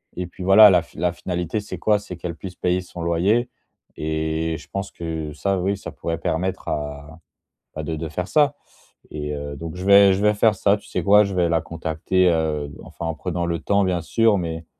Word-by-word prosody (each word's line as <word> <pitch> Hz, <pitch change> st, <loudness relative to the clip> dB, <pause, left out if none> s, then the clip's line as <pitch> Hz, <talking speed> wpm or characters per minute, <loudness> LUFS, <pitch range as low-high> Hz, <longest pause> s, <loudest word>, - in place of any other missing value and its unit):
et 90 Hz, -, -3 dB
puis, 90 Hz, +1 st, -10 dB
voilà, 100 Hz, +3 st, +8 dB
la 90 Hz, -, +4 dB
f 85 Hz, -, -17 dB
la 85 Hz, +2 st, 0 dB
finalité, 90 Hz, +3 st, -3 dB
c'est 100 Hz, -3 st, -7 dB
quoi? 105 Hz, +3 st, +2 dB
C'est 100 Hz, -3 st, -8 dB
qu'elle 85 Hz, -1 st, -5 dB
puisse 90 Hz, +1 st, -9 dB
payer 90 Hz, +1 st, 0 dB
son 90 Hz, -1 st, -9 dB
loyer 100 Hz, +9 st, +1 dB, 0.5 s
et 80 Hz, +1 st, -2 dB
je 75 Hz, -, -14 dB
pense 100 Hz, 0 st, -4 dB
que, 80 Hz, -3 st, -5 dB
ça, 95 Hz, +5 st, -1 dB
oui, 100 Hz, +2 st, 0 dB
ça -, -, -8 dB
pourrait 85 Hz, 0 st, -4 dB
permettre 90 Hz, +4 st, -2 dB
à 75 Hz, +1 st, -5 dB, 0.6 s
bah, 80 Hz, -, -4 dB
de 80 Hz, +2 st, -3 dB
de 80 Hz, 0 st, -5 dB
faire 90 Hz, +4 st, -4 dB
ça 145 Hz, +1 st, +3 dB, 0.6 s
et 75 Hz, -1 st, -4 dB
heu, 70 Hz, 0 st, -5 dB
donc, 80 Hz, +3 st, -7 dB
je 90 Hz, +1 st, -6 dB
vais 100 Hz, -1 st, +7 dB
je 95 Hz, -, -1 dB
vais 105 Hz, 0 st, +4 dB
faire 110 Hz, +1 st, +4 dB
ça. 100 Hz, +2 st, +2 dB
Tu 105 Hz, -, -17 dB
sais -, -, -3 dB
quoi? 105 Hz, +1 st, +6 dB
Je 100 Hz, -, -3 dB
vais 90 Hz, -2 st, +1 dB
la 85 Hz, +1 st, +2 dB
contacter, 85 Hz, +3 st, 0 dB
heu, 75 Hz, -3 st, -1 dB
enfin, 85 Hz, -, -8 dB
en 80 Hz, -1 st, -2 dB
prenant 90 Hz, 0 st, -3 dB
le 85 Hz, -1 st, -2 dB
temps, 100 Hz, +3 st, +1 dB
bien 90 Hz, -2 st, 0 dB
sûr, 110 Hz, +4 st, +2 dB
mais 80 Hz, -1 st, -4 dB
85 Hz, 225 wpm, -22 LUFS, 80-100 Hz, 0.6 s, voilà